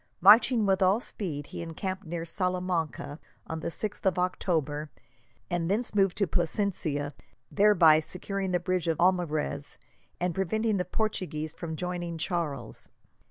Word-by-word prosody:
Marching 225 Hz, +1 st, +7 dB
with 195 Hz, -1 st, +2 dB
all 190 Hz, +3 st, +4 dB
speed, 160 Hz, -, -5 dB
he -, -, -7 dB
encamped 185 Hz, +3 st, -5 dB
near 165 Hz, 0 st, -4 dB
Salamanca 180 Hz, -5 st, -2 dB, 0.3 s
on 160 Hz, -, -4 dB
the -, -, -4 dB
6th 210 Hz, +5 st, -3 dB
of 190 Hz, -2 st, +2 dB
October, 155 Hz, -5 st, -1 dB, 0.6 s
and 175 Hz, -1 st, -1 dB
thence 220 Hz, +5 st, 0 dB
moved 195 Hz, -3 st, +2 dB
to 200 Hz, -, +3 dB
Plasencia, 165 Hz, -5 st, -1 dB, 0.4 s
thereby 175 Hz, -7 st, +6 dB
securing 190 Hz, +4 st, -3 dB
the 180 Hz, -1 st, +1 dB
bridge 180 Hz, 0 st, -1 dB
of 165 Hz, -2 st, +1 dB
Almarez, 165 Hz, -5 st, 0 dB, 0.4 s
and 180 Hz, 0 st, 0 dB
preventing 210 Hz, +4 st, 0 dB
the 180 Hz, -, -1 dB
Portuguese 175 Hz, -7 st, -2 dB
from 165 Hz, -2 st, -5 dB
joining 175 Hz, 0 st, -4 dB
Charles. 160 Hz, -3 st, -3 dB
180 Hz, 140 wpm, -28 LUFS, 160-195 Hz, 0.6 s, Marching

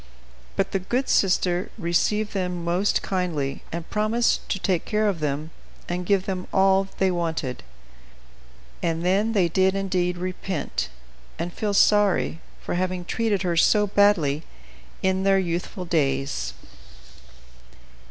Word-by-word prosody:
But -, -, 0 dB
the 195 Hz, -, 0 dB
good 245 Hz, +8 st, -1 dB
sister 180 Hz, -1 st, +2 dB
received 210 Hz, +4 st, 0 dB
them 180 Hz, -3 st, -2 dB
most 180 Hz, +4 st, +1 dB
kindly, 165 Hz, -8 st, -2 dB
and 170 Hz, 0 st, -5 dB
promised 215 Hz, +3 st, +1 dB
to -, -, 0 dB
take 185 Hz, -3 st, 0 dB
care 215 Hz, 0 st, +1 dB
of 195 Hz, -5 st, 0 dB
them 150 Hz, +1 st, -2 dB, 0.4 s
and 175 Hz, 0 st, -3 dB
give 195 Hz, -2 st, +2 dB
them 185 Hz, -3 st, -3 dB
all 195 Hz, 0 st, +4 dB
they 190 Hz, -1 st, +2 dB
wanted. 160 Hz, -7 st, -2 dB, 1.2 s
And 165 Hz, +1 st, -1 dB
then 200 Hz, +5 st, +2 dB
they 190 Hz, -5 st, +3 dB
did 190 Hz, +3 st, +2 dB
indeed 180 Hz, -2 st, 0 dB
repent 185 Hz, -, -3 dB, 0.5 s
and 175 Hz, 0 st, -4 dB
feel 205 Hz, -2 st, -1 dB
sorry 205 Hz, -5 st, +3 dB, 0.2 s
for -, -, -3 dB
having 180 Hz, 0 st, -1 dB
treated 210 Hz, -1 st, 0 dB
her 175 Hz, -2 st, 0 dB
so 210 Hz, +5 st, +4 dB
badly 190 Hz, -8 st, +3 dB, 0.6 s
in 190 Hz, 0 st, +2 dB
their 195 Hz, 0 st, +4 dB
youthful 180 Hz, +1 st, -2 dB
days. 135 Hz, -, 0 dB
185 Hz, 135 wpm, -24 LUFS, 170-195 Hz, 1.2 s, all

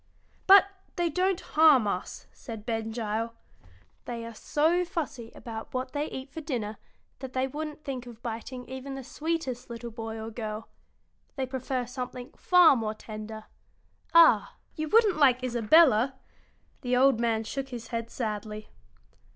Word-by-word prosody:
"But 390 Hz, 0 st, +9 dB, 0.3 s
they 345 Hz, -2 st, 0 dB
don't 370 Hz, +3 st, +1 dB
harm 305 Hz, -, +5 dB
us," 185 Hz, -2 st, -4 dB
said 220 Hz, -3 st, -9 dB
Ben 225 Hz, -2 st, -2 dB
Gile. 225 Hz, 0 st, -3 dB, 0.7 s
"They 235 Hz, -1 st, -5 dB
are 230 Hz, -, -8 dB
so 320 Hz, +9 st, +1 dB
fussy 290 Hz, -9 st, -5 dB
about 225 Hz, +1 st, -8 dB
what 255 Hz, 0 st, -2 dB
they 295 Hz, +1 st, -2 dB
eat 265 Hz, +1 st, -7 dB
for 320 Hz, -, -6 dB
dinner 230 Hz, -8 st, -3 dB, 0.4 s
that 265 Hz, -1 st, -7 dB
they 260 Hz, 0 st, +1 dB
wouldn't 300 Hz, +2 st, -6 dB
think 255 Hz, -4 st, -5 dB
of 235 Hz, -1 st, -12 dB
biting 245 Hz, +2 st, -6 dB
even 265 Hz, +1 st, -6 dB
the 270 Hz, -, -6 dB
sweetest 270 Hz, -4 st, -3 dB
little 235 Hz, 0 st, -6 dB
boy 225 Hz, 0 st, -6 dB
or 220 Hz, +1 st, -6 dB
girl. 220 Hz, -1 st, -5 dB, 0.7 s
They 265 Hz, -2 st, -1 dB
prefer 260 Hz, -1 st, -3 dB
something 250 Hz, 0 st, -6 dB
far 360 Hz, -5 st, +6 dB
more 220 Hz, -3 st, -2 dB
tender. 215 Hz, 0 st, -8 dB, 0.7 s
Ah, 235 Hz, -12 st, +6 dB, 0.2 s
you 310 Hz, 0 st, -3 dB
wouldn't 435 Hz, -3 st, +4 dB
like 260 Hz, -4 st, +4 dB
Isabella!" 255 Hz, +1 st, +4 dB, 0.7 s
The 250 Hz, -1 st, +1 dB
old 265 Hz, -2 st, +5 dB
man 225 Hz, -2 st, +1 dB
shook 270 Hz, +4 st, -4 dB
his 235 Hz, -3 st, -7 dB
head 230 Hz, -1 st, -3 dB
sadly. 215 Hz, -2 st, -4 dB
250 Hz, 150 wpm, -28 LUFS, 225-285 Hz, 0.7 s, But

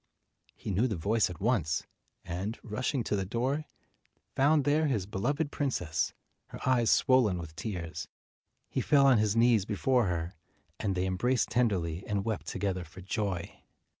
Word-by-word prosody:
He -, -, -5 dB
knew 105 Hz, +7 st, +2 dB
the 110 Hz, -, -2 dB
voice 105 Hz, +6 st, +1 dB
at 90 Hz, -3 st, -8 dB
once, 95 Hz, -, +1 dB, 0.4 s
and, 95 Hz, +6 st, -3 dB
rushing 125 Hz, +3 st, -1 dB
to 105 Hz, -, -1 dB
the 100 Hz, -, 0 dB
door, 125 Hz, +9 st, -1 dB, 0.7 s
found 145 Hz, +2 st, +4 dB
there 150 Hz, +2 st, +2 dB
his 110 Hz, -10 st, 0 dB
beloved 140 Hz, +10 st, -1 dB
princess, 90 Hz, -, -1 dB, 0.4 s
her -, -, -9 dB
eyes 120 Hz, -3 st, +3 dB
swollen 125 Hz, -8 st, +4 dB
with 80 Hz, -2 st, -8 dB
tears. 85 Hz, -1 st, -5 dB, 0.6 s
He -, -, -2 dB
fell 140 Hz, -2 st, +4 dB
on 130 Hz, -5 st, +6 dB
his 105 Hz, 0 st, +1 dB
knees 115 Hz, -3 st, +4 dB
before 115 Hz, +3 st, +1 dB
her, 85 Hz, 0 st, -2 dB, 0.5 s
and 100 Hz, -3 st, -1 dB
they 90 Hz, +1 st, 0 dB
embraced 120 Hz, +8 st, +1 dB
tenderly 95 Hz, -8 st, 0 dB
and 100 Hz, -1 st, -1 dB
wept 110 Hz, -2 st, -3 dB
together 95 Hz, -3 st, -2 dB
for 90 Hz, +3 st, -12 dB
joy. 95 Hz, -2 st, -3 dB
105 Hz, 160 wpm, -30 LUFS, 90-125 Hz, 0.7 s, on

